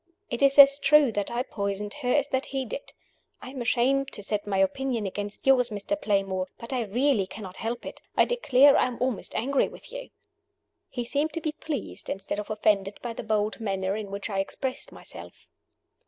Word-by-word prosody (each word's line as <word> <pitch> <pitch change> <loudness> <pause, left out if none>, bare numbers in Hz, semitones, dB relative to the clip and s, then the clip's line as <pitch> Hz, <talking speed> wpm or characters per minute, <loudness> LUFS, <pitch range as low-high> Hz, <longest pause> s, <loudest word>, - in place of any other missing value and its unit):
It 240 - -2
is 275 0 +4
as 280 0 +9
true 295 -3 +5
that 205 -2 -2
I 240 +1 -1
poisoned 200 -3 -3
her 250 -2 0
as 290 +1 +2
that 265 0 -1
he 270 -1 -2
did. 255 +5 -7 0.5
I 255 - -9
am 265 -2 -6
ashamed 260 +3 +2
to 205 - -6
set 205 +1 -2
my 195 -1 0
opinion 225 +4 0
against 205 +2 -5
yours, 255 -2 +5
Mr. 210 +7 -2
Playmore; 195 -7 0
but 235 +3 -7
I 245 -3 0
really 235 -1 +1
cannot 190 -3 -9
help 235 +2 -4
it. - - -8 0.2
I - - +6
declare 285 - +5
I - - +4
am 245 -2 -6
almost 250 -3 -2
angry 275 +3 +2
with - - -13
you." - - -7 0.8
He 245 -2 -4
seemed 290 +5 -1
to 330 - -2
be 310 - -1
pleased, 305 -1 -5
instead 195 +1 -3
of 210 - -6
offended 210 -2 +1
by 240 -1 -3
the - - -6
bold 215 0 -1
manner 195 -3 -1
in 210 -2 -5
which 200 0 -4
I 195 -3 -2
expressed 255 +6 -3
myself. - - -11
235 Hz, 200 wpm, -27 LUFS, 205-270 Hz, 0.8 s, as